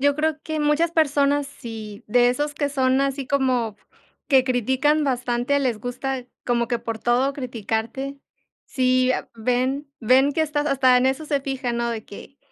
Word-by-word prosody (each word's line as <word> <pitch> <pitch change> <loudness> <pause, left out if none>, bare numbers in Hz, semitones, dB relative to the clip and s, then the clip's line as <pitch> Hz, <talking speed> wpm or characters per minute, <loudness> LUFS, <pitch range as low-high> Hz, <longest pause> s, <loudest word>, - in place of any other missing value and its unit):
Yo 285 +1 +3
creo 310 0 0
que 315 -1 -3
muchas 300 +3 +2
personas 285 -3 +2
sí, 220 -6 -9
de 245 +3 +4
esos 295 +4 -1
que 285 -1 -1
son 265 -1 +2
así 275 0 -1
como 255 -5 0 0.5
que 265 -3 +5
critican 260 +4 +1
bastante, 250 0 0
les 250 -6 -1
gusta 255 +2 -4 0.2
como 235 -1 +1
que 240 - 0
por 230 -1 -5
todo 250 +4 +1
criticarte, 250 +2 -4 0.5
si 255 0 +2
a - - -3
ven 255 +5 -1
ven 260 +4 +4
que 320 - +1
estás 295 -1 -1
hasta 260 -2 +4
en 250 +1 +3
eso 270 +4 -1
se 285 -2 0
fijan, 265 -3 -3
¿no?, 235 0 -1
de 225 -2 -5
que 270 +7 -12
265 Hz, 175 wpm, -23 LUFS, 245-285 Hz, 0.5 s, que